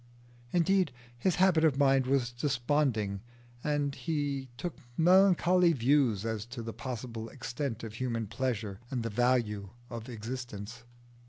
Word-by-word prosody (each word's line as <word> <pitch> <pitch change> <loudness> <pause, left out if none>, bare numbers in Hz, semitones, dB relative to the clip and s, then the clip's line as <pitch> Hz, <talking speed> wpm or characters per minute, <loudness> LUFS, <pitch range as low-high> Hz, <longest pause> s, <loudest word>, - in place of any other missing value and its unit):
Indeed 180 0 +3 0.2
his 160 +9 +1
habit 180 -3 +4
of 150 -4 +4
mind 135 -2 +4
was 130 -3 +1
desponding, 120 -5 0 0.4
and 145 -1 0
he 140 -1 -2
took 175 +4 -4 0.2
melancholy 180 0 +5
views 125 -5 +2
as 110 -2 -2
to 120 -1 -6
the 115 0 -5
possible 115 -3 -5
extent 130 -2 -4
of 110 -2 -6
human 115 -1 -2
pleasure 110 -3 -3
and 125 -3 -2
the 115 - -3
value 110 -4 +1 0.2
of 115 0 -6
existence. 115 -2 -6
125 Hz, 135 wpm, -31 LUFS, 115-145 Hz, 0.4 s, melancholy